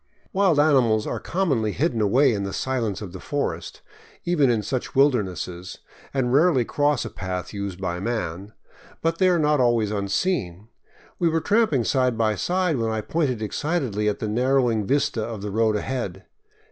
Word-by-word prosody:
Wild 190 -6 +3
animals 125 -8 +3
are - - -3
commonly 135 - 0
hidden 135 -7 0
away 125 +6 +4
in 100 - -2
the 100 -1 -4
silence 115 -6 -2
of 95 - -7
the 95 - -7
forest, 85 - -4 0.4
even 155 -7 +3
in 115 -3 +1
such 125 +5 -4
wildernesses, 95 - 0 0.3
and 130 -3 0
rarely 145 -4 +4
cross 145 -2 +1
a - - -4
path 90 -1 -5
used 100 -2 -5
by 90 -2 -3
man; 100 -2 -4 0.5
but 165 0 0
they 185 -1 +5
are 180 - +3
not 150 -2 +2
always 120 -4 +2
unseen. 100 - -2 0.5
We 170 -2 +3
were 165 0 +1
tramping 205 - +2
side 125 -1 +1
by 110 -1 +2
side 180 - 0
when 115 -1 -1
I 110 -1 -1
pointed 130 -4 -1
excitedly 115 -5 -1
at 105 - -2
the 110 - -4
narrowing 120 -2 +1
vista 135 -5 +1
of 110 -3 -6
the 105 - -4
road 110 +1 +2
ahead. 105 -5 -4
120 Hz, 170 wpm, -24 LUFS, 105-145 Hz, 0.5 s, they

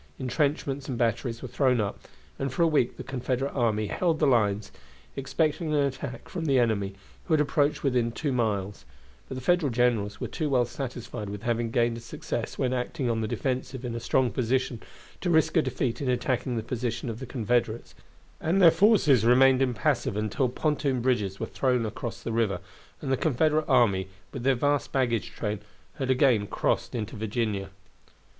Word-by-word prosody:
Intrenchments 140 +1 -1
and 125 - -2
batteries 115 +1 -1
were - - -4
thrown 125 0 +2
up, 100 -2 -2 0.4
and 135 -1 -1
for 170 - +1
a - - +5
week 145 -6 +1
the - - -6
Confederate 135 +1 -2
army 110 -4 +1
held 165 - 0
the 155 - +2
lines, 105 -6 +2 0.4
expecting 155 +3 -1
an - - +3
attack 135 -2 -4
from 170 -3 -4
the 135 -3 +3
enemy, 105 -5 +1 0.3
who 160 - +3
had - - +2
approached 150 0 +1
within 125 -4 +1
two 145 +4 -2
miles; 105 - -1 0.5
but - - -5
the 130 - -5
Federal 175 +1 +2
generals 115 -4 +1
were - - -3
too 155 -3 -2
well 125 -3 +3
satisfied 120 -5 -6
with 100 +1 -7
having 120 -1 0
gained 115 0 +1
a - - -6
success 115 - -5
when 130 -1 0
acting 125 0 -1
on 115 -1 -1
the 110 - -1
defensive 130 +2 -3
in 120 - -3
a 115 - -3
strong 120 +1 +1
position 125 -1 -1 0.4
to 180 - -2
risk 160 -2 +3
a - - +6
defeat 120 -1 -2
in 135 - -1
attacking 125 0 0
the 110 - -2
position 120 0 -3
of 115 -1 -4
the 130 - -7
Confederates, 120 -2 -1 0.5
and 170 +5 +1
their 170 -4 +8
forces 165 - +4
remained 130 +2 +5
impassive 120 -5 0
until 110 +4 0
pontoon 140 -1 0
bridges 105 -6 0
were - - -1
thrown 125 -3 0
across 110 +2 -5
the 115 - -3
river, 110 -5 +1 0.4
and 135 - -2
the 130 - +3
Confederate 155 +2 +1
army, 95 -6 +3 0.3
with - - -5
their 135 +2 +3
vast 145 +3 0
baggage 120 -5 0
train, 105 -2 -3 0.4
had 135 -1 -2
again 125 -6 +3
crossed - - -1
into 110 -4 -4
Virginia. 110 -2 -2
125 Hz, 185 wpm, -27 LUFS, 115-135 Hz, 0.5 s, their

